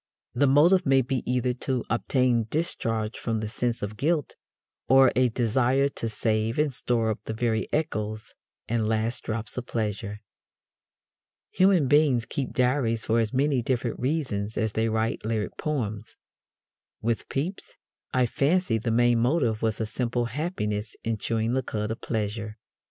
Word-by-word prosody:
The 140 +3 +3
motive 170 +7 +5
may 135 -3 +4
be 130 0 -1
either 125 0 +1
to 125 0 -2
obtain 120 -1 +1
discharge 115 -8 -2
from 115 -2 -1
the 110 - -3
sense 120 +1 -2
of 105 +1 -4
guilt 150 +3 0 0.5
or 135 -1 +7
a 125 0 +4
desire 125 +4 +2
to 115 -4 -4
save 110 +1 0
and 150 -2 +1
store 115 -2 +1
up 110 - -4
the 110 - -4
very 110 -1 -1
echoes 110 -8 -2 0.3
and 110 -1 0
last 110 +2 -1
drops 110 +2 -3
of 120 - -9
pleasure. 105 -2 -3 1.3
Human 185 -6 +4
beings 140 -4 +4
keep 135 0 -3
diaries 125 -3 +1
for 115 +1 +2
as 110 -2 0
many 135 0 +2
different 120 -1 -1
reasons 125 -7 -2
as 110 -1 0
they 110 +1 0
write 110 +1 -1
lyric 110 -1 -2
poems. 115 -9 -3 0.9
With 115 0 -1
Pepys, 165 +8 -4 0.4
I 125 -1 +3
fancy, 140 0 +1
the 115 - -2
main 120 +1 +3
motive 120 -3 +1
was 110 -1 0
a 110 - 0
simple 120 +2 -1
happiness 115 - -3
in 115 -1 -2
chewing 115 +2 0
the 130 - +1
cud 105 -3 -3
of 115 - -5
pleasure. 105 -1 -3
120 Hz, 155 wpm, -26 LUFS, 110-135 Hz, 1.3 s, or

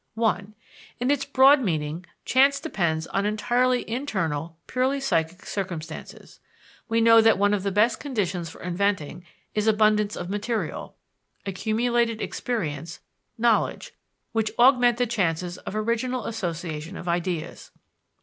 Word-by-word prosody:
(1) 215 -2 -1 0.4
In 250 +3 +1
its 290 - 0
broad 275 +1 +6
meaning, 160 -4 -2 0.2
chance 275 +2 +4
depends 170 - -1
on 195 - -1
entirely 245 +4 +1
internal, 170 - -3
purely 260 +2 0
psychic 175 -9 -1
circumstances. 180 -5 -6 0.5
We 230 0 +2
know 230 0 +7
that 225 0 +5
one 205 +1 +3
of 205 - 0
the 200 +1 -1
best 210 +5 +2
conditions 190 - -2
for - - -12
inventing 180 -2 -1 0.3
is 210 0 0
abundance 210 -1 +3
of 175 - -5
material, 210 +4 -3 0.5
accumulated 230 +3 0
experience, 170 - -4 0.4
knowledge 230 -1 +1 0.4
which 225 -2 0
augment 245 -1 +5
the 245 - +2
chances 180 -5 -1
of - - -7
original 235 +3 -1
association 170 -4 -4
of - - -8
ideas. 170 -1 -3
210 Hz, 130 wpm, -25 LUFS, 175-240 Hz, 0.5 s, know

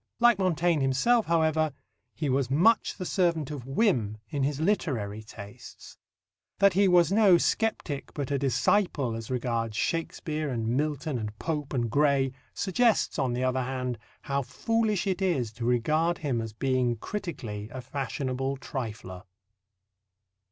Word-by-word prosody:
Like 240 -3 +5
Montaigne 175 -4 +2
himself, 175 - +2
however, 160 -2 +2 0.4
he 155 - -2
was 135 -2 +1
much 180 +12 +3
the 185 - -4
servant 170 -6 0
of 135 -4 -7
whim 135 - +1
in 140 - -2
his 140 +1 0
literary 130 - -1
tastes. 105 -1 -12 0.6
That 200 -1 +5
he 195 +2 +4
was 175 -2 +5
no 200 -4 +6
sceptic 170 -8 -1
but 145 -2 -3
a 140 - +1
disciple 140 - +1
as 115 -1 -6
regards 115 -3 -2
Shakespeare 155 -1 -2
and 115 -3 -2
Milton 145 +1 -1
and 105 -1 -5
Pope 150 -1 -3
and 120 -4 0
Gray 140 0 +2 0.2
suggests, 220 -1 +1
on 130 -3 +1
the 125 +1 -1
other 130 0 +1
hand, 125 -2 -3 0.2
how 140 0 -1
foolish 215 - 0
it 195 -1 -1
is 140 - 0
to 115 +1 -6
regard 155 +8 +2
him 130 -6 -1
as 115 -1 -5
being 125 +1 0
critically 115 - -5
a 130 - -6
fashionable 135 +1 -3
trifler. 110 -8 -6
140 Hz, 145 wpm, -28 LUFS, 125-170 Hz, 0.6 s, no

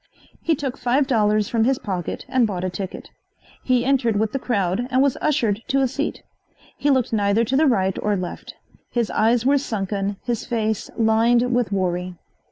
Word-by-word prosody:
He 325 - +1
took 270 -2 -4
five 255 +3 +2
dollars 215 -5 +2
from 230 -2 +1
his 260 +2 +2
pocket 190 -8 -4
and 250 -3 +2
bought 185 -3 -4
a 185 - -2
ticket. 185 +1 -7 0.5
He 250 -1 +2
entered 255 -5 +2
with 215 +1 0
the 270 - -2
crowd 205 -1 -1
and 255 0 +1
was 275 -1 +3
ushered 230 -9 +1
to 275 - +1
a 265 - +3
seat. 280 +4 -4 0.5
He 290 - 0
looked 260 -4 +2
neither 205 +1 +2
to 255 - -1
the 310 +3 +4
right 190 -7 +2
or 210 -1 +1
left. 180 -1 -6 0.3
His 235 -2 -1
eyes 230 +2 +2
were 280 +1 +4
sunken, 200 -4 -3
his 240 -3 -2
face 220 -3 -2
lined 235 +2 +3
with 240 -4 +1
worry. 180 -2 -1
230 Hz, 185 wpm, -22 LUFS, 200-255 Hz, 0.5 s, the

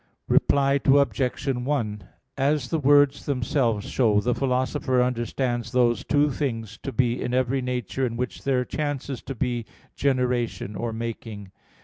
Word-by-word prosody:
Reply 140 0 +3
Obj. 140 -2 +2
1: 125 -6 -1 0.3
As 140 -2 +1
the 160 - +1
words 145 0 +4
themselves 125 -5 0
show, 110 -5 +3
the 120 +4 +1
Philosopher 130 0 0
understands 120 0 -1
those 120 -2 +2
two 145 0 +2
things 115 -7 -3
to 135 - -4
be 120 0 0
in 125 - -1
every 130 +1 +1
nature 125 -1 -2
in 115 -1 -5
which 125 0 -4
there 130 -2 +1
chances 140 -4 -3
to 135 - -6
be 120 0 -1 0.3
generation 125 -6 0
or 115 +3 -3
making. 110 -3 -6
125 Hz, 140 wpm, -25 LUFS, 115-135 Hz, 0.3 s, words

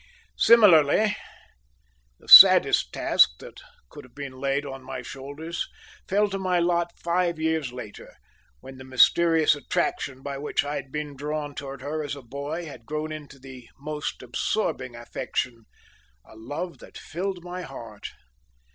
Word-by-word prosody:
Similarly, 205 -2 +5 1.0
the - - -22
saddest - - +9
task - - +3
that - - -13 0.3
could - - -11
have 130 - -19
been 140 -2 -7
laid 135 +2 -2
on 135 -1 -8
my 130 -1 -7
shoulders 145 +7 -6 0.4
fell 205 +2 +2
to 195 - -3
my 185 -1 0
lot 170 0 0
five 170 0 -1
years 160 -4 -1
later, 125 -4 -10 0.5
when 130 0 -12
the - - -9
mysterious 155 +5 +4
attraction 140 -2 -3
by 140 -1 -5
which 150 - -1
I 145 +1 -4
had 135 -1 -8
been 150 -1 -5
drawn 145 +1 -4
towards 140 -1 -8
her 155 +2 -3
as 145 -1 -5
a 140 - -11
boy 140 +7 -6
had 125 -7 -12
grown 155 +1 -4
into 150 -2 -9
the 130 -2 -13
most 150 -2 -5
absorbing 130 - -2
affection 120 0 -5 0.6
a - - -17
love 145 +10 -6
that - - -13
filled 180 +1 -5
my 180 +1 -6
heart. 115 - -9
145 Hz, 150 wpm, -25 LUFS, 130-165 Hz, 1.0 s, saddest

